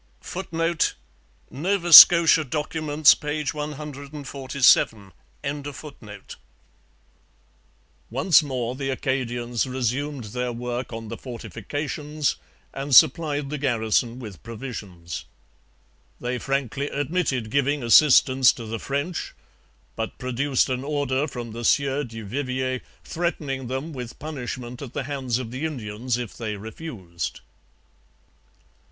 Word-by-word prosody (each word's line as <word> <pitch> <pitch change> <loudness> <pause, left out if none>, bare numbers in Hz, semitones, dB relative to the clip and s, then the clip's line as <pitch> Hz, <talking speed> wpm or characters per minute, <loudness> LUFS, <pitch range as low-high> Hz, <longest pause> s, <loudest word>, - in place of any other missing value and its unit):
[Footnote: 165 -2 -1 0.6
Nova 175 +3 0
Scotia 165 0 +10
Documents, 150 +1 +3
p. 150 +1 -3
147.] 140 -7 0 3.0
Once 140 - +4
more 125 -5 -3
the 135 0 -3
Acadians 120 -2 -2
resumed 130 +2 -2
their 125 +3 -3
work 120 +1 -4
on 115 -1 -7
the 115 - -6
fortifications 145 +5 -4 0.4
and 135 0 0
supplied 145 0 +4
the 150 - -3
garrison 120 -2 0
with 105 -8 -9
provisions. 105 - -7 0.9
They 125 +1 -3
frankly 140 +1 -2
admitted 140 -6 -1
giving 140 0 +1
assistance 130 +1 +6
to 115 - -8
the 110 +1 -4
French, 140 - -3 0.6
but 115 -1 -4
produced 130 +2 0
an 130 0 -2
order 145 -1 -1
from 120 -4 -7
the 115 +2 -7
Sieur 140 +3 +2
du 115 -4 -8
Vivier 130 +2 -2 0.2
threatening 145 -6 -3
them 135 +6 -4
with 125 -3 -7
punishment 125 -4 -6
at 135 -4 -8
the - - -3
hands 130 -3 -2
of 125 -3 -6
the 130 +4 -5
Indians 120 -5 -3
if 120 -4 -6
they 110 -3 -4
refused. 100 - -7
130 Hz, 110 wpm, -24 LUFS, 120-145 Hz, 3.0 s, Scotia